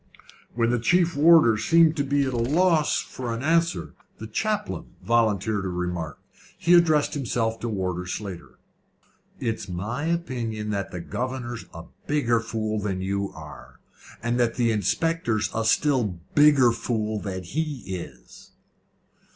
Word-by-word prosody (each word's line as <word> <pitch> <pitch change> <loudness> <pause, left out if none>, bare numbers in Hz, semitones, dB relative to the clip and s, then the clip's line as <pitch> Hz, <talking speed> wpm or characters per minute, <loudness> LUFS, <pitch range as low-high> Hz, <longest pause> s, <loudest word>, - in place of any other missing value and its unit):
When 115 0 +2
the 120 - +1
chief 175 +6 +2
warder 150 -7 +6
seemed 160 +6 +4
at 140 -1 -1
a 140 -3 +1
loss 155 +6 +2
for 125 -2 -5
an 115 - -5
answer, 165 +2 +1 0.2
the 110 - -7
chaplain 210 - -3
volunteered 110 -3 +1
a - - -2
remark. 90 -4 -3 0.4
He 175 - +3
addressed 160 -4 +4
himself 115 -5 -1
to 120 - -3
Warder 90 -3 -3
Slater. 90 -9 -6 0.8
"It's 110 -4 -3
my 105 - -3
opinion 120 -11 -2
that 100 -2 -2
the 90 - -6
governor's 120 +3 -4
a 85 -1 -9 0.2
bigger 120 -6 +2
fool 110 -1 -3
than 95 -2 -3
you 100 +1 -2
are, 75 -5 -12 0.4
and 120 +1 0
that 120 -2 +1
the 120 -2 +2
inspector's 115 - 0
a 115 - -1
still 115 - +2 0.2
bigger 145 -5 +6
fool 110 -2 -2
than 95 -2 -5
he 145 - -3
is." 95 -2 -9
115 Hz, 140 wpm, -25 LUFS, 100-145 Hz, 0.8 s, warder